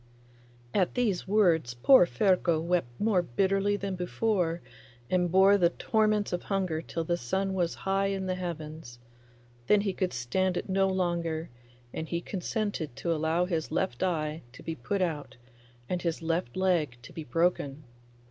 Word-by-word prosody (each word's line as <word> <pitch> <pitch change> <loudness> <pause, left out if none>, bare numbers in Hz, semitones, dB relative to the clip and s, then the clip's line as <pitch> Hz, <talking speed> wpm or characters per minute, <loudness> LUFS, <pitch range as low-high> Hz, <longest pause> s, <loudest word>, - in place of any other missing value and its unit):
At 185 -3 +1
these 220 -9 0
words 170 - +3
poor 180 - +6
Ferko 170 - +2
wept 170 -3 0
more 210 -4 +3
bitterly 195 +7 +1
than 200 -1 -3
before, 180 -1 0 0.5
and 180 -2 +2
bore 195 +2 +6
the 170 -2 +5
torments 215 +1 +1
of 175 - -1
hunger 185 -5 -1
till 165 0 -4
the 175 +1 0
sun 190 +9 -1
was 175 -3 0
high 195 +1 +2
in 195 -1 -2
the 185 - -1
heavens; 160 -7 -6 0.7
then 210 -1 +5
he 200 -2 -1
could 185 -1 -1
stand 180 +10 0
it - - -3
no 195 0 +2
longer, 170 -4 -1 0.4
and 160 - -5
he 170 - -1
consented 185 - -3
to 170 - -1
allow 160 +3 +1
his 165 -4 -2
left 190 +4 -1
eye 160 -4 -1
to - - -12
be 165 - -3
put 185 +9 -1
out 150 -6 -3 0.5
and 180 -1 -2
his 170 -1 -2
left 165 -5 -1
leg 170 -9 +1
to - - -12
be 160 - -6
broken. 150 0 0
175 Hz, 165 wpm, -29 LUFS, 160-195 Hz, 0.7 s, poor